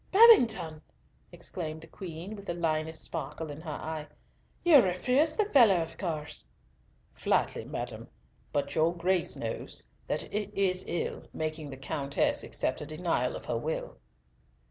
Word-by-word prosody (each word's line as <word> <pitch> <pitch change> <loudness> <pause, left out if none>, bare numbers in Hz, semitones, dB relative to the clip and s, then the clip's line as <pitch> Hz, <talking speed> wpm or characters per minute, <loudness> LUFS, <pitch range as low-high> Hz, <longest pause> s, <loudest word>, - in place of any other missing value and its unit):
"Babington!" 225 - +6 0.5
exclaimed 160 -2 -5
the - - -10
Queen, 175 +4 -7
with 200 -1 -11
the 170 - -2
lioness 160 -1 -1
sparkle 155 0 -4
in 145 +2 -8
her 160 - -7
eye. 155 0 -5 0.6
"You 310 -6 +9
refused 250 - +2
the 425 - +5
fellow 235 - +6
of 165 -1 -4
course?" 160 - -4 0.7
"Flatly, - - 0
madam, - - -5 0.4
but 145 - -1
your 165 +2 +2
Grace 175 +1 +1
knows - - -4 0.2
that - - -1
it 210 0 -1
is 185 -2 +1
ill 175 - -3
making 155 -1 -3
the 135 - -7
Countess 140 +1 0
accept 130 - -1
a - - -4
denial 155 -5 0
of - - -8
her - - -1
will." 155 +6 -4
165 Hz, 145 wpm, -30 LUFS, 155-195 Hz, 0.7 s, You